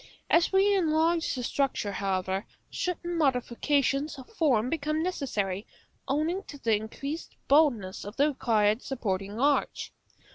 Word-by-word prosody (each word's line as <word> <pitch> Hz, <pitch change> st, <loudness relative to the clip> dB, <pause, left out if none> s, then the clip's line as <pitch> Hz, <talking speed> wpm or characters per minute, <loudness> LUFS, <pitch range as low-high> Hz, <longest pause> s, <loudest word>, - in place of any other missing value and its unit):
As 335 Hz, 0 st, +4 dB
we 395 Hz, +1 st, +4 dB
enlarge 330 Hz, -2 st, +2 dB
the 250 Hz, -, -4 dB
structure, 250 Hz, -5 st, -1 dB
however, 190 Hz, 0 st, -2 dB, 0.2 s
certain 345 Hz, -1 st, -2 dB
modifications 275 Hz, +2 st, +1 dB
of 260 Hz, -, -10 dB
form 270 Hz, -, +2 dB
become 305 Hz, +2 st, -1 dB
necessary, 210 Hz, -, -2 dB, 0.4 s
owing 310 Hz, +7 st, 0 dB
to 290 Hz, -, -9 dB
the 230 Hz, -5 st, +2 dB
increased 275 Hz, +9 st, -5 dB
boldness 265 Hz, -11 st, +3 dB
of 205 Hz, +2 st, -8 dB
the 285 Hz, +2 st, +3 dB
required 220 Hz, -5 st, +2 dB
supporting 205 Hz, -5 st, -3 dB
arch. 285 Hz, +2 st, +1 dB
275 Hz, 130 wpm, -28 LUFS, 215-315 Hz, 0.4 s, As